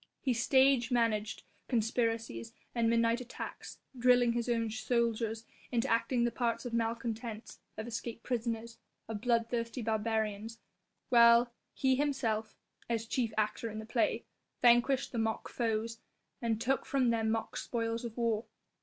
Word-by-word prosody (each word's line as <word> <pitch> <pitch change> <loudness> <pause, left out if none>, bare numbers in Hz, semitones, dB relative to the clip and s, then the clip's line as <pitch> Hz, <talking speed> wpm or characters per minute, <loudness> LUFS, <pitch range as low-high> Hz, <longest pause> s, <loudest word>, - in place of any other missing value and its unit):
He 260 - +1
stage 260 +1 +4
managed 225 -4 0 0.2
conspiracies 225 - -1 0.2
and 230 -1 +2
midnight 230 +1 +2
attacks, 250 - -7 0.2
drilling 245 -1 +4
his 235 +1 -1
own 230 -1 +1
soldiers 225 0 0 0.3
into 235 -2 +1
acting 235 +1 +2
the 240 - +2
parts 235 0 -1
of 240 - -5
malcontents, 230 -1 -3 0.2
of 220 - -4
escaped 230 0 -5
prisoners, 230 -1 -3 0.3
of 215 -2 -5
bloodthirsty 230 0 0
barbarians, 220 0 -1
the - - -32 0.5
while 235 0 +6 0.2
he 265 -1 +2
himself 230 -7 -1 0.3
as 230 -1 0
chief 230 -1 -1
actor 215 +2 0
in 215 - -7
the 220 - -6
play 230 +1 0 0.3
vanquished 245 +3 +4
the 235 - -2
mock 225 0 -1
foes 230 -1 -2 0.4
and 225 -2 0
took 265 +3 +1
from 260 -4 +2
them 225 -1 +1
mock 225 0 -2
spoils 230 0 -2
of 235 -1 -6
war. 230 -2 0
230 Hz, 145 wpm, -32 LUFS, 225-240 Hz, 0.5 s, while